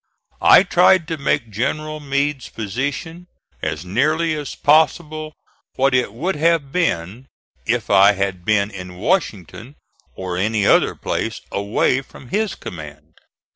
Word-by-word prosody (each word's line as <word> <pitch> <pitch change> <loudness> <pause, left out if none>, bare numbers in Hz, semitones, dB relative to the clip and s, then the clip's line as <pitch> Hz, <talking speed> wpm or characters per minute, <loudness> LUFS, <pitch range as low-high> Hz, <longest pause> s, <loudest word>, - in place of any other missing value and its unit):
I - - +7
tried 175 -4 +4
to 160 - -2
make 135 -4 -1
General 155 +8 -2
Meade's 140 -1 -2
position 140 - -4 0.3
as 80 +3 -3
nearly 155 - +1
as 150 -2 -5
possible 155 0 +1 0.4
what 135 0 +2
it 125 -5 +1
would 160 - -2
have 160 -3 +1
been 120 - -2 0.4
if - - -1
I 100 +2 +6
had 95 -2 -3
been 105 +1 +1
in 90 -2 -9
Washington 115 - -2 0.4
or 90 -2 -4
any 105 +2 0
other - - +4
place - - -3
away 100 +6 0
from 130 -2 -15
his 215 -1 -1
command. 75 -1 -10
130 Hz, 135 wpm, -20 LUFS, 100-155 Hz, 0.4 s, I